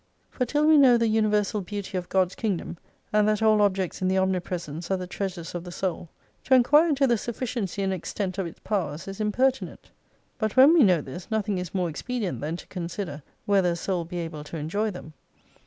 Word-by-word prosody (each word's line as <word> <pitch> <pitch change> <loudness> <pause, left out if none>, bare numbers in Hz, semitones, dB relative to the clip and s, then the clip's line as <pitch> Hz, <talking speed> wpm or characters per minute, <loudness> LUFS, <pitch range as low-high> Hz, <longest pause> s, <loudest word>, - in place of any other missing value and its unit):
For 250 - -2
till 295 +4 +1
we 310 -1 +6
know 255 -4 +7
the 230 -1 +2
universal 210 -1 +1
beauty 200 0 -6
of 180 -1 -3
God's 185 -1 +2
Kingdom, 190 -5 -3 0.4
and 210 0 +4
that 215 0 +1
all 215 -1 +5
objects 190 -3 0
in 185 - +1
the 190 +1 +1
omnipresence 180 -3 -2
are 190 - +1
the 185 - -5
treasures 180 -2 -5
of 175 -1 -4
the 175 - -8
soul, 175 -2 -3 0.4
to 260 - +5
enquire 295 +7 +5
into 280 -2 +3
the 240 -4 +2
sufficiency 225 -4 -3
and 190 0 0
extent 185 +1 -4
of 190 - -1
its 165 - -11
powers 170 -7 -3
is 195 +2 -6
impertinent. 255 +5 -1 0.5
But 215 -2 -1
when 275 +5 +8
we 340 - +6
know 180 - +5
this, 145 +9 -9
nothing 210 -3 -1
is 180 0 -6
more 180 -2 +1
expedient 210 +5 -4
than 155 +3 -3
to - - -11
consider 170 -3 -5 0.2
whether 190 -4 +3
a - - -3
soul 175 0 -2
be 175 +2 -7
able 165 -3 -5
to 165 - -7
enjoy 200 +9 -1
them. 180 -5 -9
195 Hz, 210 wpm, -26 LUFS, 175-220 Hz, 0.5 s, when